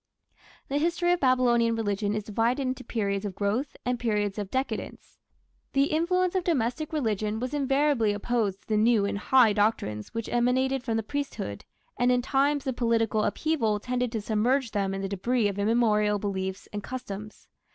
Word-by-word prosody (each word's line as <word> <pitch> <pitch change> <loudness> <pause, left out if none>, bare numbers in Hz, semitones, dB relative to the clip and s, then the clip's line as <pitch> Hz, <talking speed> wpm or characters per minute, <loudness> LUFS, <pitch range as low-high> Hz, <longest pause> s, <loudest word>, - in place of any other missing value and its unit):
The 285 +1 0
history 345 +2 +1
of 355 - 0
Babylonian 240 -3 +3
religion 205 -1 -1
is 215 - -2
divided 230 +6 0
into 255 0 -3
periods 200 -5 -2
of 200 -3 -4
growth 215 +8 -1
and 245 -1 0
periods 210 -3 -1
of 200 -2 -4
decadence. 260 +4 -4 0.5
The 275 +1 +2
influence 360 +3 +1
of 375 -2 0
domestic 305 -1 -1
religion 220 -7 -1
was 255 +3 -4
invariably 275 -5 +2
opposed 205 -2 -1
to - - -35
the 215 - +1
new 220 -1 +4
and 200 0 -2
high 240 -1 +5
doctrines 200 - 0
which 230 -1 -4
emanated 260 +2 +1
from 225 -3 -1
the 225 - -1
priesthood, 275 - -4 0.3
and 245 +1 +4
in 250 0 +2
times 280 +2 +1
of 260 -2 -2
political 225 -2 +1
upheaval 225 -5 0
tended 250 +1 -2
to 220 - -1
submerge 235 +4 +1
them 195 -2 -1
in 195 - -4
the - - -1
debris 215 +4 +1
of 200 0 -3
immemorial 210 -1 +2
beliefs 190 -1 -4
and 205 - -3
customs. 210 -3 -7
230 Hz, 175 wpm, -27 LUFS, 210-265 Hz, 0.5 s, high